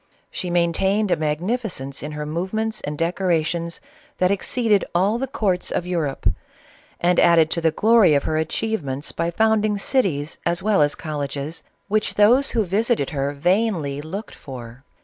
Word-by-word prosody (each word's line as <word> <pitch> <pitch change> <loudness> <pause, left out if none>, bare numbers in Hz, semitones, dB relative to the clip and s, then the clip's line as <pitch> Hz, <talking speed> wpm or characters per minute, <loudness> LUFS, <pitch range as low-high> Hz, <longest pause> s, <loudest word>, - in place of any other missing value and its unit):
She 180 - -4
maintained 185 +4 +1
a - - +5
mag 150 0 -1
nificence 185 - -3
in 150 +1 -6
her 150 0 -4
movements 200 +8 -2
and 150 0 -5
decorations, 170 -1 -1 0.4
that 185 +1 +2
ex 200 - -2
ceeded 220 -6 +2
all 200 +6 +2
the 270 - -2
courts 195 -8 -1
of 175 - -2
Europe, 160 - -2 0.7
and 175 0 +3
added 165 -2 +5
to 170 - 0
the 165 - +4
glory 215 -1 +4
of 140 - +2
her 155 - -1
achievements 155 -4 -2
by 165 +1 -1
founding 215 +2 +2
cities 190 - -1
as 170 +1 0
well 210 -6 +3
as 145 0 +2
col 155 -2 -5
leges, 140 +3 -4 0.3
which 215 +1 0
those 240 +7 +5
who 225 -3 0
visited 210 - 0
her 140 -1 -1
vainly 165 -2 0
looked 190 +8 -7
for 125 -1 -10
175 Hz, 170 wpm, -22 LUFS, 150-210 Hz, 0.7 s, a